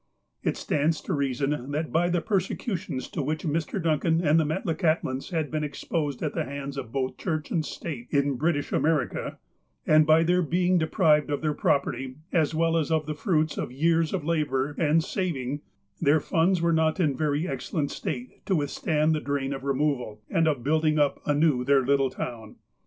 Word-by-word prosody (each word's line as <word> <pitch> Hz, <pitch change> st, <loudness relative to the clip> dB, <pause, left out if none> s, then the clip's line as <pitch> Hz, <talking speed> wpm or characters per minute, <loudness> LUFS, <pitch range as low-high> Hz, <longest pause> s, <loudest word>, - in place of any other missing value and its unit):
It -, -, -1 dB
stands 155 Hz, +2 st, 0 dB
to 190 Hz, -, -3 dB
reason, 140 Hz, -1 st, -1 dB
that 155 Hz, +2 st, -2 dB
by 175 Hz, +2 st, +2 dB
the 175 Hz, -1 st, +1 dB
persecutions 190 Hz, -, -2 dB
to 160 Hz, -, -3 dB
which 155 Hz, +3 st, -2 dB
Mr. 165 Hz, +5 st, -1 dB
Duncan 160 Hz, 0 st, +1 dB
and 160 Hz, -1 st, +3 dB
the -, -, +3 dB
Metlakahtlans 155 Hz, -3 st, -1 dB
had 160 Hz, -5 st, -2 dB
been 155 Hz, -1 st, -1 dB
exposed 145 Hz, -1 st, -3 dB
at -, -, -1 dB
the -, -, -1 dB
hands 140 Hz, +1 st, -6 dB
of 130 Hz, -5 st, -6 dB
both 130 Hz, -1 st, -2 dB
Church 155 Hz, -4 st, -3 dB
and 160 Hz, -, +1 dB
State 140 Hz, -5 st, -6 dB
in 140 Hz, 0 st, +2 dB
British 145 Hz, +2 st, -1 dB
America, 155 Hz, -3 st, 0 dB, 0.5 s
and 155 Hz, 0 st, +5 dB
by 160 Hz, +1 st, +6 dB
their 180 Hz, +2 st, +3 dB
being 180 Hz, +2 st, +2 dB
deprived 155 Hz, -2 st, +3 dB
of 145 Hz, -, -1 dB
their 155 Hz, -1 st, 0 dB
property, 135 Hz, -3 st, 0 dB, 0.2 s
as 160 Hz, -2 st, +2 dB
well 165 Hz, +1 st, +2 dB
as 160 Hz, -1 st, 0 dB
of 160 Hz, -1 st, +1 dB
the 155 Hz, -, -3 dB
fruits 155 Hz, -1 st, 0 dB
of -, -, -3 dB
years 160 Hz, +4 st, +2 dB
of 180 Hz, -6 st, -2 dB
labour 150 Hz, -4 st, 0 dB
and 160 Hz, 0 st, +3 dB
saving, 145 Hz, -7 st, -2 dB, 0.4 s
their 145 Hz, +3 st, +4 dB
funds 170 Hz, +3 st, +1 dB
were 170 Hz, 0 st, +3 dB
not 160 Hz, +2 st, +2 dB
in 155 Hz, -5 st, +3 dB
a -, -, -5 dB
very 150 Hz, +3 st, 0 dB
excellent 140 Hz, +1 st, -2 dB
state 125 Hz, -3 st, -5 dB
to 190 Hz, -, +2 dB
withstand 155 Hz, +1 st, +1 dB
the 155 Hz, -, 0 dB
drain 140 Hz, -1 st, -2 dB
of 135 Hz, -, -6 dB
removal, 135 Hz, -6 st, -1 dB
and 165 Hz, -1 st, +3 dB
of 140 Hz, -6 st, 0 dB
building 155 Hz, +1 st, +2 dB
up 145 Hz, -2 st, +2 dB
anew 145 Hz, -3 st, +3 dB
their 135 Hz, 0 st, +3 dB
little 135 Hz, 0 st, +3 dB
town. 115 Hz, -4 st, -6 dB
150 Hz, 190 wpm, -26 LUFS, 140-165 Hz, 0.5 s, by